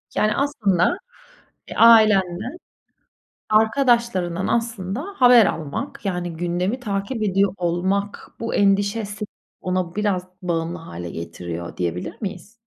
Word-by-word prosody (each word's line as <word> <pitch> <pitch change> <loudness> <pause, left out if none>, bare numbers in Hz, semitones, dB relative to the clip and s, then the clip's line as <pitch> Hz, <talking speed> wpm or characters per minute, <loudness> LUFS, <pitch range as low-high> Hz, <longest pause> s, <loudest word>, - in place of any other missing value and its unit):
Yani, 215 0 +2
aslında, 225 - +1 0.7
eee, - - -8
ailenden, 215 - +5 0.9
arkadaşlarından 220 -6 +2
aslında 230 -1 -2 0.2
haber 245 -3 +7
almak, 155 +5 -4
yani 175 -3 -3
gündemi 180 +7 -1
takip 215 +1 -3
ediyor 195 -1 +2
olmak 185 +4 -2
bu 230 - -3
endişesi 205 +1 +1 0.4
ona 185 -1 -2
biraz 200 -4 -1
bağımlı 170 -1 -2
hâle 85 - -8
getiriyor 85 +1 -7
diyebilir 90 0 -3
miyiz? 205 0 -6
195 Hz, 105 wpm, -22 LUFS, 175-220 Hz, 0.9 s, haber